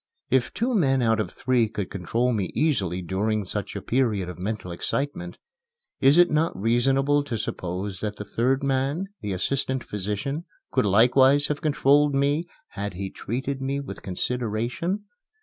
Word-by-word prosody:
If 120 Hz, -2 st, +2 dB
two 240 Hz, +4 st, -1 dB
men 135 Hz, -, +3 dB
out 115 Hz, -1 st, +3 dB
of 110 Hz, -, -1 dB
three 120 Hz, -3 st, +1 dB
could 105 Hz, -4 st, -4 dB
control 115 Hz, +7 st, 0 dB
me 105 Hz, -4 st, 0 dB
easily 95 Hz, -, +1 dB
during 105 Hz, +4 st, -1 dB
such 100 Hz, +2 st, -4 dB
a -, -, -5 dB
period 110 Hz, -8 st, +1 dB
of 90 Hz, -, -8 dB
mental 100 Hz, -1 st, -4 dB
excitement, 145 Hz, -, -3 dB, 0.6 s
is 140 Hz, +4 st, +5 dB
it 175 Hz, -1 st, +6 dB
not 155 Hz, -, +1 dB
reasonable 135 Hz, +6 st, +2 dB
to 120 Hz, -5 st, -3 dB
suppose 95 Hz, 0 st, -4 dB
that 105 Hz, -1 st, -3 dB
the 105 Hz, -, -7 dB
third 130 Hz, +6 st, +1 dB
man, 140 Hz, +7 st, 0 dB
the 105 Hz, -, -3 dB
assistant 130 Hz, +6 st, -1 dB
physician, 105 Hz, -, -3 dB, 0.3 s
could 130 Hz, -5 st, +2 dB
likewise 130 Hz, +7 st, +5 dB
have 150 Hz, -1 st, -2 dB
controlled 145 Hz, -1 st, +3 dB
me 145 Hz, +5 st, +1 dB, 0.2 s
had 100 Hz, -2 st, -5 dB
he 95 Hz, +1 st, -4 dB
treated 135 Hz, +4 st, -4 dB
me 135 Hz, +1 st, -1 dB
with 140 Hz, -, -7 dB
consideration? 125 Hz, -, -2 dB
125 Hz, 160 wpm, -25 LUFS, 105-140 Hz, 0.6 s, it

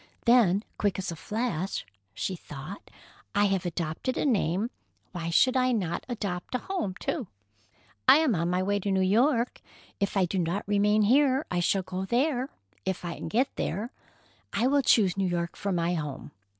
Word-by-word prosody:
Then, 220 Hz, -5 st, +5 dB, 0.2 s
quick 205 Hz, -3 st, +1 dB
as 190 Hz, -2 st, -3 dB
a -, -, -5 dB
flash, 200 Hz, -1 st, -2 dB, 0.3 s
she 190 Hz, -, -2 dB
thought, 155 Hz, +4 st, -9 dB, 0.5 s
"I 205 Hz, 0 st, +4 dB
have 195 Hz, -3 st, 0 dB
adopted 170 Hz, +8 st, -3 dB
a -, -, 0 dB
name—why 190 Hz, -, -2 dB
should 255 Hz, +10 st, +4 dB
I 255 Hz, 0 st, +3 dB
not 180 Hz, -7 st, -2 dB
adopt 200 Hz, -3 st, -3 dB
a -, -, +3 dB
home, 340 Hz, -, -3 dB
too? 275 Hz, -, -2 dB, 0.8 s
I -, -, +9 dB
am 310 Hz, -6 st, +3 dB
on 170 Hz, -1 st, 0 dB
my 180 Hz, +1 st, +1 dB
way 205 Hz, +1 st, +1 dB
to 200 Hz, -, -3 dB
New 190 Hz, -1 st, +2 dB
York. 235 Hz, +5 st, +2 dB, 0.4 s
If 200 Hz, 0 st, 0 dB
I 190 Hz, -, +4 dB
do 185 Hz, +2 st, -2 dB
not 175 Hz, +4 st, -1 dB
remain 210 Hz, +1 st, +3 dB
here, 270 Hz, +5 st, +4 dB
I 175 Hz, -, +1 dB
shall 190 Hz, +2 st, +1 dB
go 185 Hz, +1 st, -4 dB
there—if 235 Hz, -, -2 dB
I 170 Hz, -, -3 dB
can -, -, -6 dB
get 240 Hz, +10 st, 0 dB
there. 210 Hz, +8 st, -2 dB, 0.6 s
I 235 Hz, -, +1 dB
will 280 Hz, +2 st, +4 dB
choose 200 Hz, -7 st, +4 dB
New 195 Hz, -1 st, +1 dB
York 170 Hz, -1 st, -2 dB
for 200 Hz, -, -3 dB
my 175 Hz, -1 st, +1 dB
home. 150 Hz, -5 st, -4 dB
200 Hz, 175 wpm, -28 LUFS, 175-240 Hz, 0.8 s, I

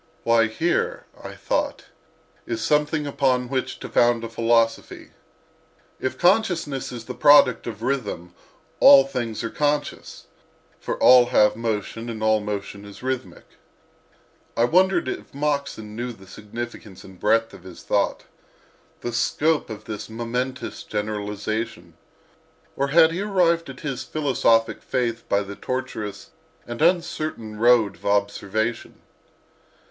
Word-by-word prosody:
Why, 115 Hz, -1 st, +4 dB
here, 175 Hz, -, -1 dB, 0.2 s
(I -, -, -8 dB
thought) -, -, -2 dB, 0.6 s
is 345 Hz, -, -3 dB
something 150 Hz, 0 st, +1 dB
upon 130 Hz, -3 st, 0 dB
which 130 Hz, -1 st, -2 dB
to -, -, -5 dB
found 120 Hz, -1 st, +2 dB
a 115 Hz, -, -5 dB
philosophy. 115 Hz, 0 st, 0 dB, 0.9 s
If 130 Hz, -, -3 dB
consciousness 175 Hz, -8 st, +1 dB
is 120 Hz, -2 st, -8 dB
the 125 Hz, -, -6 dB
product 145 Hz, -4 st, +5 dB
of 110 Hz, -1 st, -6 dB
rhythm 105 Hz, -10 st, -3 dB, 0.5 s
all 140 Hz, -1 st, +9 dB
things 120 Hz, -5 st, -4 dB
are 115 Hz, -, -3 dB
conscious, 145 Hz, 0 st, -2 dB, 0.5 s
for -, -, -4 dB
all 125 Hz, -1 st, +7 dB
have 105 Hz, -4 st, +4 dB
motion, 115 Hz, +1 st, -3 dB
and 110 Hz, -2 st, -5 dB
all 110 Hz, 0 st, +3 dB
motion 105 Hz, -1 st, -5 dB
is 100 Hz, +3 st, -12 dB
rhythmic. 125 Hz, -9 st, -4 dB, 1.1 s
I 115 Hz, -, +3 dB
wondered 180 Hz, +4 st, +3 dB
if 130 Hz, -, -6 dB
Moxon 140 Hz, -7 st, -2 dB
knew 120 Hz, +2 st, -4 dB
the 95 Hz, -3 st, -16 dB
significance 105 Hz, -1 st, -8 dB
and 95 Hz, -2 st, -14 dB
breadth 115 Hz, +2 st, +2 dB
of -, -, -12 dB
his -, -, -12 dB
thought—the 120 Hz, -, -5 dB
scope 150 Hz, +6 st, +1 dB
of 110 Hz, -2 st, -8 dB
this 110 Hz, -1 st, -6 dB
momentous 125 Hz, +3 st, -4 dB
generalization; 105 Hz, -3 st, -4 dB, 0.8 s
or 140 Hz, -, 0 dB
had 160 Hz, +3 st, +5 dB
he 175 Hz, +4 st, -3 dB
arrived 175 Hz, -6 st, +1 dB
at 130 Hz, -1 st, -10 dB
his 135 Hz, -3 st, -4 dB
philosophic 125 Hz, -6 st, +1 dB
faith 115 Hz, -2 st, -2 dB
by 100 Hz, 0 st, +2 dB
the 100 Hz, 0 st, -8 dB
tortuous 130 Hz, -5 st, -5 dB, 0.3 s
and 120 Hz, +2 st, -7 dB
uncertain 155 Hz, -10 st, 0 dB
road 115 Hz, -3 st, +4 dB
of -, -, -19 dB
observation? 100 Hz, +2 st, -1 dB
120 Hz, 130 wpm, -23 LUFS, 110-140 Hz, 1.1 s, all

